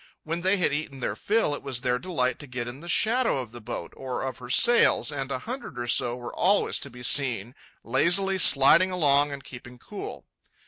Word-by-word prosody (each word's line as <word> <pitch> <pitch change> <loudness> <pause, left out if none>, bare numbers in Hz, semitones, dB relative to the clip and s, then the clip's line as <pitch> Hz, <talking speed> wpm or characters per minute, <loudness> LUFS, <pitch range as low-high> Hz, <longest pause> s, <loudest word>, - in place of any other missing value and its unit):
When 165 +2 -4
they 190 +3 +1
had 175 -5 0
eaten 145 -2 -4
their - - -3
fill, 215 -8 0
it 145 - -5
was 130 -3 -4
their 125 -1 -1
delight 135 -9 -2
to 145 - -10
get 125 -1 -5
in 120 +3 -8
the 170 - -12
shadow 230 - +2
of 125 -4 -6
the 120 0 -11
boat, 105 - -7
or 130 -2 -5
of 130 -1 -5
her 125 -1 -11
sails, 235 - +4
and 140 -1 -5
a - - -1
hundred 235 - -8
or 120 - -4
so 120 0 +1
were 120 -1 -9
always 200 +3 +1
to 140 - -6
be 125 -1 -13
seen 120 -4 +2 0.3
lazily 185 +10 +2
sliding 165 +5 +6
along 145 -5 +2
and 140 -1 -7
keeping 125 0 -11
cool. 200 +11 -9
140 Hz, 215 wpm, -25 LUFS, 125-180 Hz, 0.3 s, sliding